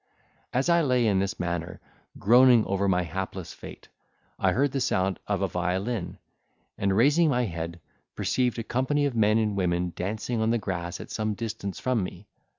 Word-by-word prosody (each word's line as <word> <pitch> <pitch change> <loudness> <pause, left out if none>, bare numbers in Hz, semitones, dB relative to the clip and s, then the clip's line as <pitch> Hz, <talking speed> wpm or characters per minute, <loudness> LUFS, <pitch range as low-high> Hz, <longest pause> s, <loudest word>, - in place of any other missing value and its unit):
As 130 +5 0
I 170 -1 +4
lay 125 -5 +2
in 100 -3 +3
this 100 +3 -2
manner, 85 0 -3 0.4
groaning 120 +1 +6
over 100 +1 0
my 90 -2 +2
hapless 95 +1 -5
fate, - - -11 0.5
I - - +3
heard 140 +2 +1
the 135 - -2
sound 95 -6 0
of - - 0
a - - +2
violin, 90 +3 -2 0.6
and 95 0 0
raising 150 +7 +4
my 125 -3 +2
head, 85 -2 -5 0.4
perceived 125 -2 0
a 115 - -3
company 130 +5 0
of 140 -4 -1
men 110 -1 +3
and 105 -2 0
women 90 -2 0
dancing 110 +5 -2
on 110 - +2
the 120 - +2
grass 90 -5 -4
at - - -9
some 110 -1 -2
distance 110 -3 -5
from 125 -5 0
me. 90 +2 -7
105 Hz, 180 wpm, -27 LUFS, 90-125 Hz, 0.6 s, groaning